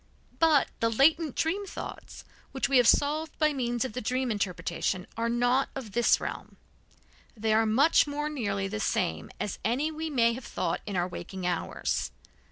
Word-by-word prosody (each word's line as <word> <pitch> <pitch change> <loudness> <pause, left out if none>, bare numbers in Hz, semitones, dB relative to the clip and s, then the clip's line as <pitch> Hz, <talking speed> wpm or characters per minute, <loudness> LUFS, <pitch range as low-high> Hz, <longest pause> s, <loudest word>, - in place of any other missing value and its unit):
But 315 -4 +4
the 230 - +2
latent 295 +5 +3
dream 390 +5 -1
thoughts, - - -8 0.3
which 265 - 0
we 275 - +4
have 245 -2 +5
solved 305 +4 +2
by 305 -1 +2
means 240 -2 -1
of 255 - -5
the 250 - -3
dream 255 +2 -1
interpretation, 185 -2 -2
are 230 +1 -1
not 245 +3 +2
of 255 -6 -6
this 235 +3 +3
realm. - - -6 0.8
They 220 0 +1
are 220 0 +3
much 280 +9 +4
more 295 +1 -2
nearly 205 -10 -2
the 215 +2 -4
same 80 - -1
as 205 - -3
any 260 - 0
we 320 +1 -4
may 235 -5 +3
have 250 +1 -7
thought 170 -1 -2
in 200 - -3
our 175 0 +1
waking 185 +1 -7
hours. 175 -2 -1
240 Hz, 175 wpm, -28 LUFS, 210-290 Hz, 0.8 s, have